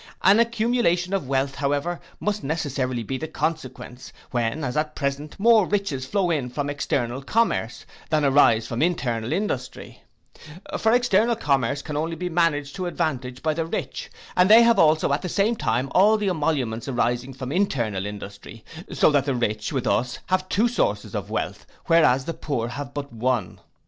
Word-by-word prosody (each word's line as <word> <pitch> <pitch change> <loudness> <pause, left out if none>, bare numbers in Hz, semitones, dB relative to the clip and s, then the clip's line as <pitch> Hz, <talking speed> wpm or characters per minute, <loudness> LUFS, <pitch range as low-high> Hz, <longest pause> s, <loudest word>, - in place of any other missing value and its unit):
An 200 +3 +6
accumulation 230 -6 +1
of 190 -9 -1
wealth, 135 0 0
however, 145 +5 -1 0.2
must 210 0 -2
necessarily 135 -5 -2
be 130 +4 -4
the 160 - -4
consequence, 130 -5 -5 0.2
when 120 +5 -1
as 125 -1 -3
at 150 0 -1
present 145 +3 -3
more 220 -2 +5
riches 180 -11 -2
flow 190 -1 0
in 140 -6 -1
from 145 +3 -3
external 130 -3 -2
commerce, 140 - 0 0.2
than 155 -2 +2
arise 135 -5 +4
from 115 - -3
internal 125 -9 0
industry: 160 -8 -4 0.8
for 220 - +3
external 235 -1 +3
commerce 140 - 0
can 150 - -5
only 165 +2 -2
be 180 +1 -4
managed 160 -5 0
to 185 -1 -2
advantage 125 -7 -3
by 155 -1 +1
the 165 +1 -1
rich, - - -4 0.3
and 180 +1 +4
they 225 +2 +9
have 230 -3 +4
also 155 -2 +4
at 145 - 0
the 180 - -4
same 205 +7 +1
time 125 - -1
all 210 +4 +5
the 205 -2 0
emoluments 145 -9 -1
arising 120 0 -1
from 130 0 -6
internal 120 - 0
industry: 105 +2 -9 0.3
so - - +3
that 140 -2 +2
the 140 -3 0
rich, 110 -3 -2
with 130 -4 -2
us, 125 0 0
have 185 0 -1
two 220 +5 +2
sources 240 - -1
of - - -4
wealth, - - -4 0.2
whereas 155 -7 +4
the 165 - -3
poor 120 -8 -3
have 140 +2 -6
but 140 -3 -6
one. 115 -4 -1
145 Hz, 175 wpm, -24 LUFS, 125-180 Hz, 0.8 s, they